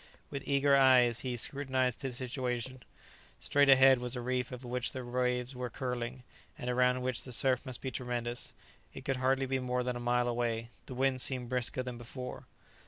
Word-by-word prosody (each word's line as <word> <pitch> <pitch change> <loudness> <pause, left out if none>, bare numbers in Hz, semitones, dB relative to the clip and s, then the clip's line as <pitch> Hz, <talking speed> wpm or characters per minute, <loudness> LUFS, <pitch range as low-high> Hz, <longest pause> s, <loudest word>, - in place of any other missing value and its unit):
With 140 -1 -5
eager 140 0 +4
eyes 125 -3 +5
he 125 -2 -2
scrutinized 130 -1 -1
his 130 -3 -4
situation. 130 -1 -3 0.6
Straight 145 0 +3
ahead 135 -1 +7
was 125 +1 -3
a - - -3
reef 125 +1 -1
over 125 0 -7
which 125 0 -2
the 130 -1 -5
waves 125 +1 -1
were 125 0 -4
curling, 125 0 -4 0.3
and 125 - -3
around 125 0 +2
which 130 -2 -2
the 130 - -8
surf 130 +2 +2
must 130 - -5
be 130 - -3
tremendous. 120 -1 -3 0.4
It - - -9
could 135 - 0
hardly 135 +1 +2
be 135 0 -1
more 125 0 -1
than 125 0 -2
a - - -4
mile 120 0 +1
away. 115 -1 -1 0.2
The 130 - -7
wind 130 0 +2
seemed 125 -3 +1
brisker 130 0 0
than 125 -1 -6
before. 125 +2 -7
125 Hz, 190 wpm, -32 LUFS, 125-130 Hz, 0.6 s, ahead